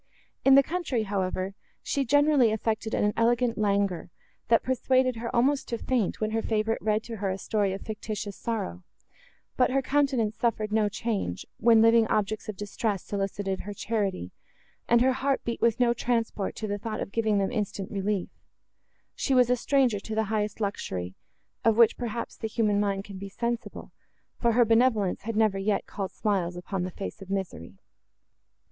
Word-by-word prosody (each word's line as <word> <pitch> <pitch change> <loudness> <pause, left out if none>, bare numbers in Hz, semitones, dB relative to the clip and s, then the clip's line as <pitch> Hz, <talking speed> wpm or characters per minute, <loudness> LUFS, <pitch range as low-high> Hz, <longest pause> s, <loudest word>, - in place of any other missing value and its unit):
In 270 0 +7
the 275 - +7
country, 310 -8 -1
however, 190 -1 -2 0.3
she 280 - 0
generally 285 -2 +4
affected 220 0 -1
an 210 0 +1
elegant 235 +1 +2
languor, 200 -4 0 0.4
that 230 0 +4
persuaded 255 -1 +1
her 235 +1 -4
almost 275 +4 +2
to 235 - -2
faint, 240 -4 -1
when 215 0 -1
her 225 0 0
favourite 220 0 0
read 215 0 +1
to 230 -1 -7
her 195 -1 -2
a 190 - -2
story 205 -1 0
of 195 - -5
fictitious 210 -1 -5
sorrow; 90 - -4 0.7
but 250 - +4
her 270 +1 +1
countenance 260 -6 +1
suffered 215 -3 0
no 215 -1 +2
change, 200 - -3
when 225 -1 +6
living 230 0 +5
objects 215 +1 -1
of 210 - -5
distress 205 -1 -2
solicited 195 -1 -3
her 205 +1 -6
charity, 195 - -2 0.6
and 235 0 +5
her 260 +1 +4
heart 270 +1 0
beat 235 - -3
with 235 0 +2
no 240 -1 +4
transport 230 -4 -1
to 220 - -4
the 205 -1 -3
thought 220 +1 -4
of - - -4
giving 220 -2 +1
them 195 +2 0
instant 205 -4 -3
relief;—she 205 +6 -5
was 250 -1 +5
a - - +5
stranger 250 -4 +2
to 220 +2 -6
the 220 - +2
highest 210 0 -1
luxury, 95 - -3 0.5
of 225 -1 +3
which, 235 -2 +6
perhaps, 235 -1 -4
the 220 - -4
human 210 -2 +1
mind 200 -1 0
can 200 -2 -9
be 200 0 -7
sensible, 235 +3 -4 0.5
for 235 -1 +2
her 240 +1 +5
benevolence 225 -4 +2
had 225 +2 -4
never 215 -3 +2
yet 200 +1 0
called 195 -2 -5
smiles 190 -5 -1
upon 180 +2 -4
the 180 - -2
face 195 +3 -7
of 195 - -10
misery. 175 - -4
220 Hz, 180 wpm, -27 LUFS, 200-235 Hz, 0.7 s, In